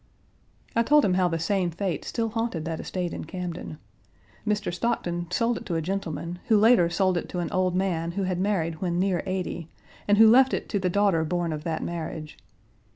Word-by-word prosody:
I 230 - +4
told 295 +5 +4
him 190 - +2
how 180 0 +3
the 165 -1 -1
same 180 +2 0
fate 175 -1 -3
still 230 -1 -1
haunted 225 -8 -2
that 165 -1 -3
estate 180 -2 -3
in - - -5
Camden. 175 -2 -6 0.7
Mr. 210 -3 0
Stockton 175 -4 -2
sold 230 +5 +1
it - - -9
to 175 - -1
a 165 - 0
gentleman, 175 -1 -4
who 220 - +5
later 210 -5 +5
sold 185 +1 +1
it - - -8
to - - -5
an 170 -2 -3
old 185 -1 +1
man 170 -3 -1
who 200 +1 -1
had 185 -1 -1
married 170 -5 -1
when 175 -2 -1
near 185 -1 +1
eighty, 180 -3 -3 0.4
and 205 0 +4
who 220 +1 +8
left 260 +4 +6
it - - -5
to 205 - 0
the 185 -1 0
daughter 195 -3 +2
born 170 0 -1
of 150 0 -5
that 160 -2 -2
marriage. 160 -2 -5
180 Hz, 210 wpm, -26 LUFS, 170-205 Hz, 0.7 s, who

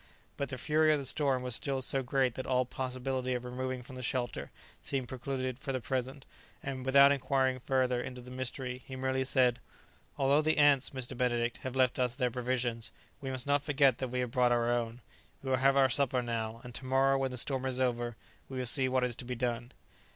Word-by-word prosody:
But 140 - -3
the 130 - -5
fury 155 +4 +3
of 155 - +3
the 140 - -4
storm 135 -2 +2
was 125 -1 -2
still 135 +3 0
so 135 +1 +1
great 130 -1 +1
that 130 - -6
all 130 -1 +2
possibility 130 0 -3
of 125 0 -4
removing 130 0 -4
from 130 +1 -11
the 130 - -6
shelter 120 -1 -2 0.3
seemed 130 -3 -2
precluded 130 0 -4
for 135 0 -4
the 130 - -1
present, 130 +2 -3 0.4
and, 135 -2 -4
without 140 +1 +7
inquiring 130 -1 +1
farther 130 -1 +1
into 125 0 -7
the 125 +1 -11
mystery, 130 0 -4
he 130 - -7
merely 130 0 0
said, 125 -2 +2 0.6
"Although 140 +2 +4
the 155 +1 +1
ants, 145 -3 +5
Mr. 130 -1 -3
Benedict, 120 -1 0
have 130 0 -6
left 130 -1 +2
us 125 -1 +1
their 125 -2 0
provisions, 125 -2 -1 0.3
we 135 - -4
must 130 -1 +2
not 145 0 +2
forget 140 -3 +3
that 130 - -2
we 125 +1 -2
have 125 -2 -3
brought 125 -2 +3
our 120 0 +2
own. 120 0 -2 0.4
We 135 - -2
will 130 - +3
have 135 +2 +3
our 135 -1 +6
supper 130 -1 +1
now, 115 -1 -3
and 125 -1 -9
to 130 - -6
morrow, 135 +1 +3
when 135 0 0
the 125 - -6
storm 130 +1 0
is 130 -1 -1
over, 120 -2 0 0.3
we 135 - -6
will 130 - -2
see 130 +2 +3
what 130 0 +1
is 125 -2 0
to - - -6
be 125 0 -3
done." 120 0 -2
130 Hz, 225 wpm, -31 LUFS, 125-135 Hz, 0.6 s, without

